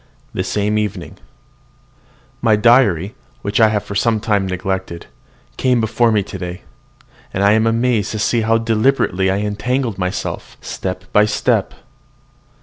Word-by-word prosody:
THE - - -1
SAME 105 +1 0
EVENING. 105 -4 -5 1.2
My 115 -2 +4
diary, 105 -4 +3 0.3
which 100 0 -1
I 110 - +7
have 105 -2 -1
for - - -7
some 110 +2 +1
time 105 -3 0
neglected, 95 -1 -4 0.5
came 125 -2 +2
before 115 +1 +2
me 105 -2 +2
today; 90 -2 -7 0.7
and 95 - -1
I 100 - +5
am 110 +1 +3
amazed 115 -2 +1
to - - -3
see 115 +2 +1
how 115 +1 +2
deliberately 115 -4 +1
I 95 - +1
have 105 - -2
entangled 115 +1 -2
myself 90 0 -4
step 90 -1 -5
by 105 - +5
step. 105 - 0
105 Hz, 145 wpm, -18 LUFS, 95-115 Hz, 1.2 s, I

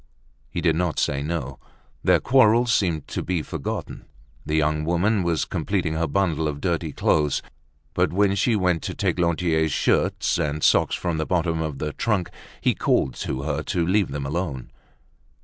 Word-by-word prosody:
He - - -4
did 80 - +2
not 85 -1 -1
say 70 -1 0
no. 70 -3 -4 0.4
Their - - +4
quarrel 120 -2 +4
seemed 90 - 0
to - - -3
be 90 -3 -2
forgotten. - - -5 0.4
The 75 +1 -2
young 75 0 +1
woman 90 +6 +1
was 85 -2 0
completing 90 -6 -1
her 80 +1 0
bundle 80 -1 0
of 75 -1 -4
dirty 85 -2 -1
clothes. 75 -1 +1 0.5
But - - +1
when 100 +2 +2
she 110 +4 +2
went 90 -4 +1
to - - -4
take - - -1
Lantier's 85 -2 +1
shirts - - +1
and 75 +1 -2
socks - - +4
from 85 -3 -2
the 80 - -2
bottom 85 -2 0
of 75 -3 -3
the 75 +2 -3
trunk, 105 -6 -1 0.3
he - - +3
called 65 - +1
to 65 - -3
her 75 0 -1
to 85 +2 -1
leave 95 +2 +2
them 70 0 -4
alone. 75 -3 -3
80 Hz, 175 wpm, -24 LUFS, 75-90 Hz, 0.5 s, Their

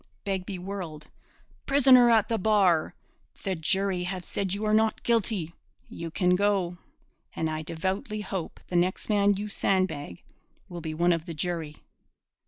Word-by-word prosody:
Begbie 190 -1 -3
whirled: 180 -5 -7 0.6
'Prisoner 265 -3 +6
at 220 -2 +4
the 225 - -1
bar, 190 -6 +3 0.5
the 195 - -1
jury 190 +3 0
have 180 0 -4
said 195 -2 -2
you 205 +3 -1
are 215 - +1
not 220 0 +2
guilty. 215 -8 0 0.4
You 165 0 -6
can 180 +2 +2
go, 190 -3 0 0.6
and 160 - -1
I 155 0 -3
devoutly 190 - -3
hope 190 -4 -5
the 180 - -6
next 180 +4 0
man 205 -1 +3
you 205 +2 -4
sandbag 185 - -1 0.4
will 175 -1 -7
be 155 -1 -5
one 175 +2 +3
of 165 -1 -3
the 165 - -5
jury.' 160 -2 -4
190 Hz, 155 wpm, -27 LUFS, 170-205 Hz, 0.6 s, Prisoner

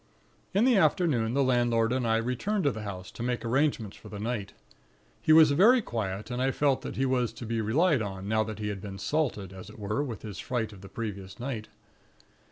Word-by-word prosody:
"In 210 +4 +4
the 255 -4 +5
afternoon, 135 - +2
the 140 - +3
landlord 120 -2 +2
and 130 -2 0
I 115 0 +3
returned 125 - -1
to 145 - +3
the 110 - -6
house, 95 -3 -6
to - - -9
make 120 0 -2
arrangements 125 -4 0
for - - -13
the 105 - -7
night. 105 -1 -3 0.7
He - - +2
was 155 -2 +8
very 215 - +6
quiet, 110 - -4
and 125 +1 -2
I 130 - +2
felt 140 0 +1
he 135 - +1
was 125 -3 +1
to 120 - -8
be 115 0 -1
relied 140 - +3
on, 95 -2 -5
now 110 +1 +2
that 110 -1 -6
he 105 -1 -3
had 100 -2 -5
been 95 -1 -7
'salted,' 105 - -1
as 95 +1 -10
it 105 - -13
were, 105 +7 -1
with 120 -7 -6
his 105 -4 -7
fright 115 -4 -2
of 95 - -13
the 95 - -11
previous 100 -4 -6
night. 120 -4 -4
115 Hz, 220 wpm, -28 LUFS, 105-135 Hz, 0.7 s, was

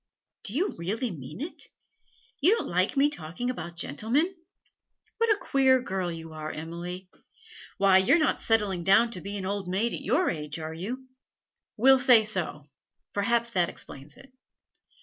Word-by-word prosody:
'Do 215 - -5
you 370 +8 +1
really 215 +8 -2
mean 150 0 -9
it? 315 +5 -6 0.7
You 360 +10 +5
don't - - -4
like 185 +9 0
me 280 +1 +5
to - - -6
talk 160 +1 -10
about 210 -9 -3
gentlemen? 235 - 0 0.9
What 460 0 +2
a 425 - +4
queer 265 -7 +3
girl 190 -6 -3
you 165 -1 -8
are, 155 0 -5
Emily! 175 +3 -6 0.7
Why, 195 -1 +5
you're 190 - +4
not 310 -4 +1
settling 205 -6 +1
down 200 +6 +5
to 180 - -7
be 200 +3 -5
an 190 - -5
old 200 -1 -3
maid 200 +6 0
at - - -4
your 340 +8 +1
age, 150 -1 -5
are 160 0 -5
you?' 240 +11 -6 0.7
'We'll 265 +4 +6
say 245 -3 +6
so; 175 -8 -3 0.5
perhaps 235 +3 +1
that 175 -5 +1
explains 140 +2 -11
it.' 275 -1 -17
200 Hz, 170 wpm, -27 LUFS, 170-255 Hz, 0.9 s, We'll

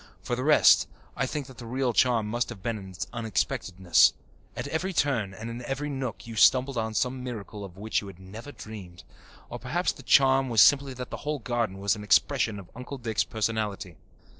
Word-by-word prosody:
For 120 - -1
the 125 - -3
rest, 150 +1 +6 0.3
I 135 - -1
think 145 +1 -4
the 130 -2 -11
real 125 0 0
charm 120 -2 +3
must 120 +3 -1
have 110 -6 -9
been 115 -2 -2
in 95 -1 -10
its 90 - -5
unexpectedness. 95 -6 +2 0.4
At - - -4
every 185 +4 -2
turn 130 - +1
and 110 +4 -8
in 115 +1 -6
every 145 +2 -3
nook 130 -4 -5
you 115 -1 -8
stumbled 130 +5 +4
on 110 -1 -2
some 125 +2 -1
miracle 110 -4 -7
of 95 -2 -10
which 110 +3 -1
you 100 - -9
had 95 -3 -11
never 105 +9 -10
dreamed. 100 -9 -10 0.4
Or - - -7
perhaps 150 - -1
the 140 - -12
charm 135 0 +4
was 115 -2 +2
simply 135 +4 +5
that 125 0 -7
the - - -4
whole 150 0 -3
garden 120 -7 -2
was 100 +2 +1
an 105 - -8
expression 105 +2 +2
of 95 -3 -11
Uncle 125 +3 -7
Dick's 115 -3 -1
personality. 105 -5 -3
115 Hz, 205 wpm, -27 LUFS, 105-130 Hz, 0.4 s, rest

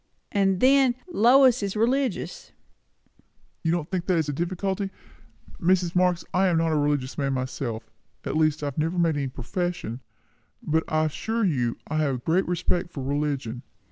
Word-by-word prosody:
"And 195 -2 +2
then, 265 -1 +5
Lois 255 - +5
is 200 0 -2
religious." 245 +1 -1 1.1
"You 165 - +1
don't 170 -2 -2
think 180 -2 -2
that 185 -2 +2
is 160 -2 0
a - - -1
difficulty? 190 +5 -2 0.7
Mrs. 180 -1 +2
Marx, 180 -1 +2
I 190 +1 +3
am 175 -2 +2
not 165 0 +1
a - - +1
religious 145 -3 0
man 135 -1 0
myself; 130 -3 -4 0.4
at - - -2
least 155 -1 +2
I - - 0
have 145 0 -3
never 165 +3 0
made 165 -3 +2
any 140 -2 -1
profession; 155 - -4 0.6
but 160 +1 +1
I 155 0 +1
assure 220 +8 -1
you 125 -9 0
I 155 - -2
have 145 -4 +1
a - - -3
great 165 +9 0
respect 175 0 -1
for 140 - -6
religion." 140 -4 -2
165 Hz, 175 wpm, -25 LUFS, 145-190 Hz, 1.1 s, then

